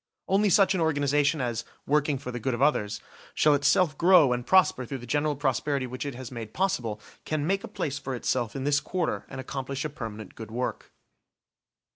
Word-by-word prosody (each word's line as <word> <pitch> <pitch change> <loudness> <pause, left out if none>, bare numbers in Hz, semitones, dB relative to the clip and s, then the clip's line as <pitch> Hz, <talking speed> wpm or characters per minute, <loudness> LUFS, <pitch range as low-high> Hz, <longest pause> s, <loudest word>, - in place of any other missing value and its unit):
Only 200 +2 +3
such 195 +1 +5
an 185 - 0
organisation, 145 -1 +2
as, 120 -3 -2 0.2
working 145 0 +2
for 125 -1 -6
the 120 - -5
good 125 +1 -1
of 120 - -6
others, 105 -8 +1 0.3
shall 150 - +4
itself 155 +3 +3
grow 170 -7 +6
and 120 0 -2
prosper 185 -4 +4
through 135 +3 -5
the 120 - -10
general 145 +4 0
prosperity 140 0 0
which 130 +3 -5
it 140 - -5
has 130 0 -8
made 115 -3 -7
possible, 120 - -1 0.2
can 155 -2 -2
make 195 +3 0
a - - -5
place 145 -1 -3
for 135 -2 -4
itself 120 -2 -1
in 135 - -3
this 145 +1 +3
quarter 170 +3 -2
and 135 - -7
accomplish 135 +1 -4
a - - -1
permanent 110 -6 -7
good 110 -1 -9
work. 125 +3 -4
140 Hz, 200 wpm, -27 LUFS, 125-155 Hz, 0.3 s, grow